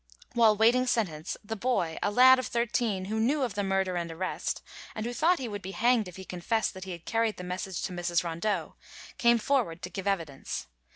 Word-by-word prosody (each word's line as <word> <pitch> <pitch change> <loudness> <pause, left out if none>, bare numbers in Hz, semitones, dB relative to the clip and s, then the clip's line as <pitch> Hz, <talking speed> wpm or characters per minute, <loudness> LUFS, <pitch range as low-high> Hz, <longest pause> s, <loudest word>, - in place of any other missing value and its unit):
While 225 -3 +5
waiting 240 +4 +4
sentence, 180 -10 -1
the 220 +2 -4
boy, 200 -8 -1
a - - +1
lad 255 +4 +7
of 255 - -3
thirteen, 230 -5 0
who 215 +3 -2
knew 270 +6 +2
of 240 -6 -1
the 205 +1 -1
murder 190 -2 0
and 170 -1 -3
arrest, 185 +3 -3 0.3
and 215 - -3
who 240 - -3
thought 335 +7 +3
he 260 - -4
would 205 -2 -5
be 190 +1 -7
hanged 235 -2 +3
if 180 - -10
he 190 -1 -9
confessed 200 +6 -1
that 190 0 -8
he 190 - -6
had 170 -1 -8
carried 225 -1 0
the 180 - -7
message 180 0 -4
to 185 - -3
Mrs. 175 -1 0
Rondeau, 170 +2 -2 0.5
came 235 0 +5
forward 225 -9 0
to 180 - -5
give 195 0 -5
evidence. 165 -9 -2
205 Hz, 220 wpm, -29 LUFS, 180-235 Hz, 0.5 s, lad